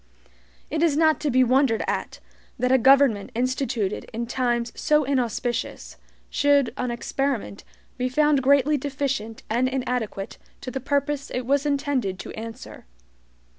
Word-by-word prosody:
It 310 Hz, +1 st, -1 dB
is 320 Hz, -4 st, +3 dB
not 315 Hz, -1 st, +4 dB
to 300 Hz, -1 st, -1 dB
be 255 Hz, 0 st, +4 dB
wondered 255 Hz, -2 st, +2 dB
at, -, -, -3 dB, 0.4 s
that 250 Hz, +1 st, +1 dB
a 260 Hz, -, +5 dB
government 265 Hz, -5 st, +4 dB
instituted 250 Hz, -4 st, -1 dB
in 235 Hz, +1 st, -3 dB
times 240 Hz, -1 st, -1 dB
so 300 Hz, 0 st, +2 dB
inauspicious, 245 Hz, -3 st, -2 dB, 0.3 s
should 285 Hz, -3 st, +2 dB
on 250 Hz, -, -2 dB
experiment 240 Hz, -2 st, -3 dB, 0.4 s
be 250 Hz, 0 st, 0 dB
found 295 Hz, +1 st, +3 dB
greatly 280 Hz, +2 st, +4 dB
deficient 265 Hz, -5 st, -3 dB
and 245 Hz, +4 st, +1 dB
inadequate 250 Hz, -6 st, -3 dB, 0.2 s
to 255 Hz, -, -6 dB
the 265 Hz, -, -3 dB
purpose 280 Hz, +1 st, -1 dB
it 250 Hz, -1 st, -3 dB
was 280 Hz, +3 st, +1 dB
intended 275 Hz, -9 st, -1 dB
to -, -, -8 dB
answer. 225 Hz, -, -9 dB
260 Hz, 140 wpm, -24 LUFS, 235-280 Hz, 0.4 s, a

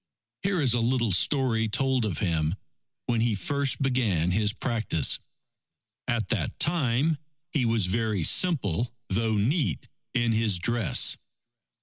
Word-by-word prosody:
Here 195 Hz, -2 st, 0 dB
is 125 Hz, -4 st, +3 dB
a 120 Hz, -, +1 dB
little 120 Hz, -1 st, +1 dB
story 115 Hz, -, +1 dB
told 130 Hz, 0 st, +1 dB
of 95 Hz, -8 st, -3 dB
him 80 Hz, -2 st, 0 dB, 0.5 s
when 120 Hz, -2 st, 0 dB
he 115 Hz, -2 st, +1 dB
first 140 Hz, +8 st, -1 dB
began 110 Hz, -11 st, +1 dB
his 105 Hz, +2 st, +1 dB
practice. 110 Hz, -, 0 dB, 0.9 s
At 120 Hz, -2 st, -1 dB
that 100 Hz, -9 st, -2 dB
time, 155 Hz, -1 st, +1 dB, 0.3 s
he 135 Hz, -5 st, 0 dB
was 115 Hz, -4 st, +1 dB
very 105 Hz, -1 st, -1 dB
simple 120 Hz, -, +1 dB
though 110 Hz, +2 st, 0 dB
neat, 110 Hz, -, -1 dB, 0.3 s
in 120 Hz, -2 st, +2 dB
his 110 Hz, -3 st, +2 dB
dress. 115 Hz, +1 st, +2 dB
115 Hz, 130 wpm, -26 LUFS, 100-130 Hz, 0.9 s, is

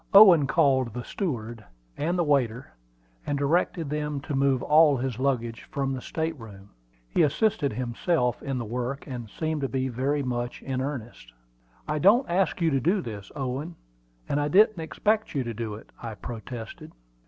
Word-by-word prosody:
Owen 180 Hz, -9 st, +9 dB
called 130 Hz, -5 st, +2 dB
the 125 Hz, -, -4 dB
steward 120 Hz, -, -4 dB, 0.3 s
and 170 Hz, +4 st, -1 dB
the 175 Hz, -, +2 dB
waiter, 135 Hz, -5 st, 0 dB, 0.5 s
and 145 Hz, -, -1 dB
directed 160 Hz, +2 st, +1 dB
them 150 Hz, -1 st, -2 dB
to 145 Hz, -, -5 dB
move 135 Hz, -2 st, +2 dB
all 150 Hz, -2 st, +5 dB
his 125 Hz, -2 st, -3 dB
luggage 120 Hz, -4 st, -1 dB
from 135 Hz, -3 st, -1 dB
the 130 Hz, -, -4 dB
state 160 Hz, +3 st, -3 dB
room. 100 Hz, -3 st, -12 dB, 0.4 s
He -, -, +1 dB
assisted 150 Hz, -1 st, +2 dB
himself 125 Hz, +2 st, 0 dB
in 135 Hz, -2 st, -3 dB
the 120 Hz, -, -3 dB
work, 125 Hz, +5 st, -4 dB
and 120 Hz, -6 st, -6 dB
seemed 155 Hz, +4 st, -2 dB
to 135 Hz, -, -1 dB
be 130 Hz, 0 st, -1 dB
very 135 Hz, +4 st, 0 dB
much 120 Hz, -1 st, -3 dB
in 130 Hz, -1 st, -2 dB
earnest. 120 Hz, -, -6 dB, 0.6 s
"I 150 Hz, 0 st, -1 dB
don't 215 Hz, -, +5 dB
ask 180 Hz, 0 st, 0 dB
you 165 Hz, -1 st, +3 dB
to 135 Hz, -, +2 dB
do 180 Hz, -, +1 dB
this, 105 Hz, -5 st, -7 dB
Owen; 140 Hz, +5 st, -4 dB, 0.5 s
and 145 Hz, -, 0 dB
I 145 Hz, -, +1 dB
didn't 210 Hz, +4 st, +5 dB
expect 210 Hz, +5 st, 0 dB
you 135 Hz, -, +1 dB
to 120 Hz, -1 st, -4 dB
do 110 Hz, -1 st, -4 dB
it," 110 Hz, -, -13 dB
I 115 Hz, -2 st, -6 dB
protested. 115 Hz, 0 st, -8 dB
135 Hz, 175 wpm, -26 LUFS, 120-155 Hz, 0.6 s, Owen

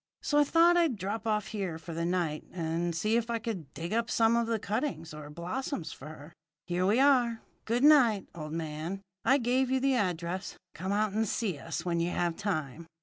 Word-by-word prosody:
So 295 Hz, -, +2 dB
I -, -, +7 dB
thought 335 Hz, +4 st, +5 dB
I'd 330 Hz, -7 st, +3 dB
drop 205 Hz, +4 st, -4 dB
off 210 Hz, -1 st, 0 dB
here 195 Hz, -7 st, -3 dB
for 165 Hz, +1 st, -8 dB
the 165 Hz, +1 st, -1 dB
night, 170 Hz, -4 st, -1 dB
and 170 Hz, 0 st, -2 dB
see 215 Hz, +7 st, +2 dB
if 235 Hz, 0 st, -2 dB
I 235 Hz, -, 0 dB
could 210 Hz, -11 st, -5 dB
dig 170 Hz, +4 st, -4 dB
up 230 Hz, +1 st, 0 dB
some 225 Hz, 0 st, +3 dB
of 235 Hz, -1 st, +1 dB
the 230 Hz, -1 st, +1 dB
cuttings 210 Hz, -, -3 dB
or 150 Hz, -1 st, -8 dB
blossoms 175 Hz, -, -4 dB
for 135 Hz, -, -10 dB
her. 155 Hz, +1 st, -11 dB, 0.3 s
Here 180 Hz, +1 st, 0 dB
we 215 Hz, +5 st, +3 dB
are. 250 Hz, -5 st, +3 dB, 0.2 s
Good 235 Hz, +3 st, 0 dB
night, 250 Hz, -10 st, +6 dB
old 155 Hz, -2 st, -6 dB
man. 165 Hz, +4 st, -4 dB, 0.2 s
I 270 Hz, -, +5 dB
gave 255 Hz, 0 st, +1 dB
you 260 Hz, 0 st, +2 dB
the 270 Hz, +1 st, +2 dB
address. 185 Hz, -4 st, -2 dB, 0.2 s
Come 190 Hz, +4 st, -4 dB
out 210 Hz, 0 st, +1 dB
and 220 Hz, +1 st, +1 dB
see 195 Hz, -8 st, -1 dB
us 165 Hz, +1 st, -5 dB
when 170 Hz, -1 st, 0 dB
you 170 Hz, +1 st, +1 dB
have 175 Hz, -1 st, 0 dB
time." 165 Hz, -6 st, -3 dB
195 Hz, 210 wpm, -30 LUFS, 170-235 Hz, 0.3 s, I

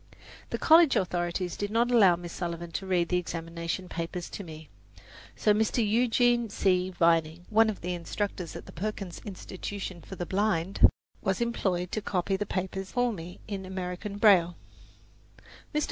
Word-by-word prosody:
The -, -, -2 dB
college 325 Hz, -2 st, +6 dB
authorities 175 Hz, -1 st, -1 dB
did 205 Hz, -, -3 dB
not 235 Hz, +3 st, +2 dB
allow 200 Hz, -7 st, +6 dB
Miss 175 Hz, 0 st, -8 dB
Sullivan 170 Hz, -1 st, -4 dB
to 190 Hz, +3 st, -4 dB
read 175 Hz, -2 st, +1 dB
the 180 Hz, -, +2 dB
examination 170 Hz, +1 st, -4 dB
papers 170 Hz, 0 st, -5 dB
to 200 Hz, -, -6 dB
me; 155 Hz, -2 st, -10 dB, 0.7 s
so 210 Hz, -, +3 dB
Mr. 220 Hz, +1 st, +1 dB
Eugene 240 Hz, +1 st, +3 dB
C. 185 Hz, -2 st, +1 dB
Vining, 165 Hz, -1 st, +2 dB
one 220 Hz, +1 st, +5 dB
of 210 Hz, -, -4 dB
the 180 Hz, +1 st, -2 dB
instructors 175 Hz, 0 st, -4 dB
at -, -, -8 dB
the -, -, -11 dB
Perkins 195 Hz, 0 st, -5 dB
Institution 190 Hz, -2 st, -6 dB
for 190 Hz, -, -9 dB
the 175 Hz, -, -4 dB
Blind, 190 Hz, -2 st, +3 dB, 0.3 s
was 190 Hz, 0 st, 0 dB
employed 190 Hz, -7 st, -1 dB
to 215 Hz, -, -2 dB
copy 195 Hz, -1 st, 0 dB
the 205 Hz, +1 st, -3 dB
papers 190 Hz, 0 st, -3 dB
for 245 Hz, -1 st, +2 dB
me 175 Hz, -1 st, -9 dB
in 200 Hz, -2 st, -4 dB
American 185 Hz, +2 st, -5 dB
braille. 180 Hz, -5 st, +5 dB, 1.2 s
Mr. 300 Hz, -, +1 dB
185 Hz, 160 wpm, -28 LUFS, 175-210 Hz, 1.2 s, college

